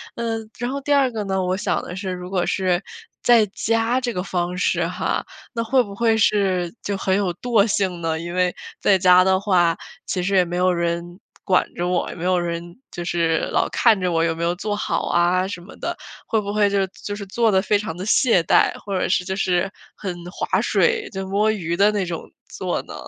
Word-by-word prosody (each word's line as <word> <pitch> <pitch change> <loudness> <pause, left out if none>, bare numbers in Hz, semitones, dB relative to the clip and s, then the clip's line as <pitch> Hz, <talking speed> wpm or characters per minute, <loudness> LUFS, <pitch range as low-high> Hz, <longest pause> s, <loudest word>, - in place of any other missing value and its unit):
嗯， 225 -2 -3
然 245 +1 -2
后 280 - -3
第 290 +1 +1
2 275 -3 +3
个 220 -2 -3
呢， 190 -1 -1
我 180 0 0
想 205 - -1
的 180 - -7
是 190 0 -4
如 180 0 -6
果 185 -2 0
是 185 -2 +1 0.4
在 235 -3 +5
家 225 +5 0
这 245 -2 -2
个 180 - -2
方 180 -1 -2
式 - - +1
哈， - - -2 0.3
那 230 - -1
会 255 +3 +3
不 200 -3 -9
会 225 +1 +2
是 190 -5 +1
就 200 - -2
很 190 -1 +1
有 195 -3 0
惰 225 0 +2
性 190 -4 0
呢？ 165 -1 -1
因 170 +1 -6
为 180 0 +1 0.2
在 195 - +4
家 185 0 +6
的 190 0 +4
话， 180 -4 +2 0.3
其 180 - -2
实 195 +2 0
也 185 -1 +5
没 175 +1 -5
有 180 0 +3
人 170 +1 -2 0.2
管 185 -2 +3
着 175 - -3
我， 180 -1 0
也 - - -7
没 170 - -7
有 180 0 +2
人 170 +1 -4
就 175 - -5
是 170 -2 +1
老 - - +2
看 225 -4 +3
着 180 -1 0
我 165 -1 +2
有 165 -1 +1
没 165 - -4
有 175 +1 0
做 205 +3 -3
好 205 - -2
啊 175 +2 +2
什 195 - -6
么 175 - -13
的， - - -4 0.3
会 220 - +1
不 205 -1 -4
会 210 -1 +3
就 200 -1 +1 0.2
就 205 - -3
是 200 - -6
做 225 +3 +1
得 190 -1 +3
非 210 +1 +2
常 205 -6 -5
地 185 - -5
懈 230 - +4
怠？ - - +4
或 200 -2 -3
者 - - 0 0.2
就 190 - -2
是 185 -1 +1 0.3
很 185 -4 -5 0.2
划 - - 0
水 465 -4 +1
就 190 0 -5
摸 205 +3 +2
鱼 170 -6 -2
的 200 +4 +4
那 205 -3 -1
种 170 -2 -4 0.3
做 - - -3
呢？ - - -10
190 Hz, 240 characters per minute, -22 LUFS, 175-210 Hz, 0.4 s, 家